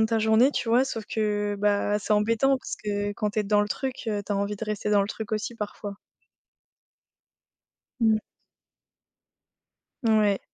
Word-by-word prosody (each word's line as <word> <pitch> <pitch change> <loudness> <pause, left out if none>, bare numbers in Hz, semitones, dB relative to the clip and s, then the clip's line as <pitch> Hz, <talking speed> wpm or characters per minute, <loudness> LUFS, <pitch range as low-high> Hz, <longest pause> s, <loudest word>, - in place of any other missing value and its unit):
de 220 - +4
ta 225 0 +1
journée, 220 +4 +4
tu - - -2
vois? 245 +3 +4
Sauf 225 -5 -4
que, 205 -1 -1
bah 205 0 +2
c'est 210 - -1
embêtant, 230 +6 +3
parce - - -6
que 205 0 -1
quand 210 0 -2
tu 215 - 0
es - - 0
dans 205 +1 +3
le 205 - 0
truc, 260 +4 -2
heu, 210 -2 -1
tu 205 - -3
as - - 0
envie 200 +1 -1
de 225 - -4
rester 210 0 -2
dans 205 -1 +4
le 200 - -3
truc 220 0 -6
aussi, 215 +2 -2
parfois. 205 -2 -6 2.1
Mmh. 220 -1 +4 1.9
Ouais. 215 -3 +3
210 Hz, 175 wpm, -26 LUFS, 205-225 Hz, 2.1 s, de